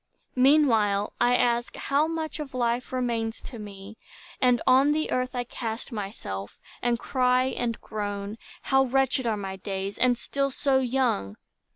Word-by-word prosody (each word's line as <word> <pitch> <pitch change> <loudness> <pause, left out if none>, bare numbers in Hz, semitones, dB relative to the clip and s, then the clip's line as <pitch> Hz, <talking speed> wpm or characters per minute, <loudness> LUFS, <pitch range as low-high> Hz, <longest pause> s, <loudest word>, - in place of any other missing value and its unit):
Meanwhile, 235 -7 +4
I 245 +1 +4
ask, 240 0 +1
how 285 +3 +1
much 320 -1 -3
of 275 -4 -6
life 240 0 0
remains 235 -3 -1
To 240 - -9
me; 205 0 -10 0.4
and 250 -1 +4
on 265 +3 +5
the 310 +1 -1
earth 255 0 -1
I 245 - 0
cast 230 0 -5
myself, 195 - -6 0.2
And 240 -1 +1
cry, 250 0 +2
and 245 -3 -2
groan. 205 0 -4 0.2
How 270 0 +3
wretched 265 0 +1
are 220 -2 +1
my 195 -1 -5
days, 195 +1 -4
And 250 -1 +3
still 275 +3 -1
so 270 0 +1
young! 245 - 0
245 Hz, 155 wpm, -26 LUFS, 210-265 Hz, 0.4 s, on